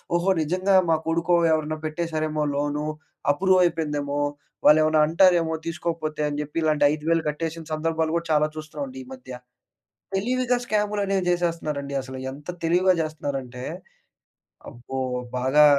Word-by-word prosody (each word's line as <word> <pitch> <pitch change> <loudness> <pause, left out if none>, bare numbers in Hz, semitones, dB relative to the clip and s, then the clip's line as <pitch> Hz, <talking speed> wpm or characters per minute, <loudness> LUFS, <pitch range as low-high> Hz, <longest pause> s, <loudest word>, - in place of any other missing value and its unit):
"ఓహో! 175 +3 +2
నిజంగా 185 +5 +1
మా 160 - +5
కొడుకో 170 +1 +2 0.2
ఎవరైనా 155 0 0
పెట్టేసరేమో 155 -1 -2
లోను, 145 +1 -1 0.5
అప్రూవ్ 185 +3 +3
అయిపోయిందేమో, 150 -4 -1 0.5
వాళ్లేమైనా 155 0 +6
అంటారేమో 170 -2 +4
తీసుకోకపోతే" 160 -2 -3
అని 145 - -4
చెప్పి, 150 +3 -9
ఇలాంటి 155 -2 +3
5000 160 +2 0
కట్టేసిన 165 +2 -4
సందర్భాలు 160 0 0
కూడా 170 - -4
చాలా 150 0 +3
చూస్తున్నాం 155 - -5
అండి 260 +1 -9
ఈ - - -18
మధ్య. 255 - -11 0.9
తెలివిగా 250 +4 +1
స్కాములు 210 -1 0
అనేవి 195 -2 0
చేసేస్తున్నారండి. 155 -5 -1
అసలు 130 0 -8
ఎంత 145 +4 -13 0.2
తెలివిగా 180 +3 +4
చేస్తున్నారంటే, 135 -5 -5 1.1
అబ్బో! 125 +2 -6 0.4
బాగా 130 +4 +5
160 Hz, 130 wpm, -24 LUFS, 150-175 Hz, 1.1 s, వాళ్లేమైనా